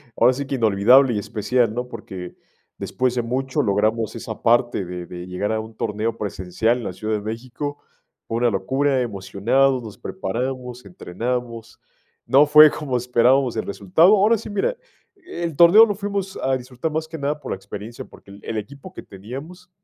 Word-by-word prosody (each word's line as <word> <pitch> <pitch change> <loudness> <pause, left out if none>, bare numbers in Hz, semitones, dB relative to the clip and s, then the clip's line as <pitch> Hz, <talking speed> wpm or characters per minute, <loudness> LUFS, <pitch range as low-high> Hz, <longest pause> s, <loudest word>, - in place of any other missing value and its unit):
ahora 125 +2 +4
sí 140 +1 -5
que 140 - -2
inolvidable 120 +3 +4
y 105 - -1
especial, 110 +3 0
¿no? 125 +1 -3
Porque 90 -6 -9 0.4
después 125 -1 -1
de 120 - +1
mucho, 130 +3 -1
logramos 110 +2 0
esa - - -7
parte 120 -4 +2
de 90 0 -6
de 90 +1 -9
llegar 90 +3 -3
a 110 - 0
un 110 0 -9
torneo 110 +1 -2
presencial 100 +3 -1
en - - -7
la 90 - -4
Ciudad 110 +4 -4
de 105 - -3
México. 125 +7 -5 0.5
Fue 115 - -2
una 120 0 +2
locura, 135 +6 0
emocionados, 120 +5 0
nos 110 -3 -10
preparamos, 125 - -5
entrenamos. 115 +5 -5 0.5
No 140 +3 +5
fue 150 0 +8
como 140 -4 -4
esperábamos 125 +1 +2
el - - -1
resultado. 105 - +3
Ahora 215 +3 +4
sí, 215 - -9
mira, 210 - -1 0.4
el 360 - -6
torneo 185 +7 +8
lo 205 - -2
fuimos 200 -1 -4
a 130 0 +1
disfrutar 125 +5 -5
más 160 +1 -2
que 165 - -6
nada 145 0 -2
por - - -7
la - - -1
experiencia, 100 +4 -8
porque 100 - -17
el 100 - -12
el 115 - -4
equipo 140 - -8
que - - -9
teníamos, 135 - -10
125 Hz, 180 wpm, -22 LUFS, 105-140 Hz, 0.5 s, fue